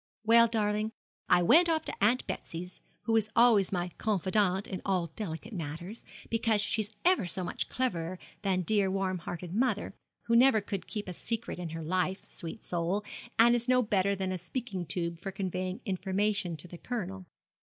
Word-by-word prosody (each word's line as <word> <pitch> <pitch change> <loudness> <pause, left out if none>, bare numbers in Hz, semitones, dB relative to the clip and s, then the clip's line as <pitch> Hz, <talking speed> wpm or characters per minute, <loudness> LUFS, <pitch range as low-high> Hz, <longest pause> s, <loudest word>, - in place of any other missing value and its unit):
'Well, 230 +1 +7
darling, 215 -1 0 0.4
I 180 0 +5
went 335 - +6
off 320 -1 +1
to - - -4
Aunt 240 +5 +3
Betsy, 170 +2 -5 0.4
who 225 - +1
is 215 -1 +1
always 230 -5 +5
my 180 -1 -1
confidante 195 -1 +1
in 185 - -5
all 180 -4 0
delicate 210 +2 -5
matters, 170 +5 -6 0.3
because 225 -2 +2
she's 210 0 0 0.2
ever 355 - +4
so 185 +1 -2
much 175 - -3
cleverer 185 -8 -1 0.2
than 190 -3 +1
dear 200 0 +2
warm 190 -1 -1
hearted 175 +1 -6
mother, 225 -1 0 0.3
who 230 - +2
never 245 -1 +6
could 200 -2 -5
keep 210 -3 -5
a 180 - -4
secret 225 +1 -4
in 175 -2 -4
her 165 0 -5
life, 185 +3 -1
sweet 170 +6 -7
soul, 175 +4 -1 0.3
and 235 +1 +7
is 240 0 +1
no 250 0 +5
better 200 -2 +2
than 190 -1 -2
a 185 - -3
speaking 185 -1 -4
tube 170 -2 -1
for 195 - -5
conveying 185 -1 -3
information 195 -1 0
to 155 - -5
the 175 0 -10
Colonel. 195 -6 -5
195 Hz, 180 wpm, -30 LUFS, 180-220 Hz, 0.4 s, Well